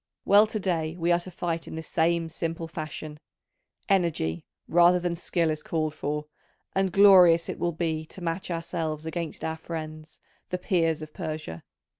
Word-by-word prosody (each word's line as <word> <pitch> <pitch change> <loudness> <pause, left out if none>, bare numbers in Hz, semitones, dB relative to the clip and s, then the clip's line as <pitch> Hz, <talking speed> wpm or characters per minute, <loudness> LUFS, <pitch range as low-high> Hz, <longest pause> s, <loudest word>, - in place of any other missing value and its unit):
Well, 205 +2 +6
to 215 0 -3
day 165 -4 -1
we 170 0 +1
are 175 - +4
to 175 - -7
fight 170 -1 -3
in - - -7
this 160 0 -7
same 170 0 +1
simple 165 0 -4
fashion: 155 -1 -7 0.7
energy, 165 - 0 0.2
rather 175 +1 +5
than 175 -1 -1
skill, 170 -1 0
is 155 0 -3
called 155 -2 -2
for, 150 0 -3 0.5
and 190 -1 +1
glorious 180 -4 +7
it - - -4
will 175 - 0
be 160 -1 -2
to - - -11
match 175 +2 -3
ourselves 165 -2 -3
against 165 0 -4
our 160 0 -2
friends, 155 -1 -7 0.3
the 180 - -1
Peers 165 -4 0
of 155 - -10
Persia. 155 - -5
165 Hz, 170 wpm, -27 LUFS, 155-175 Hz, 0.7 s, glorious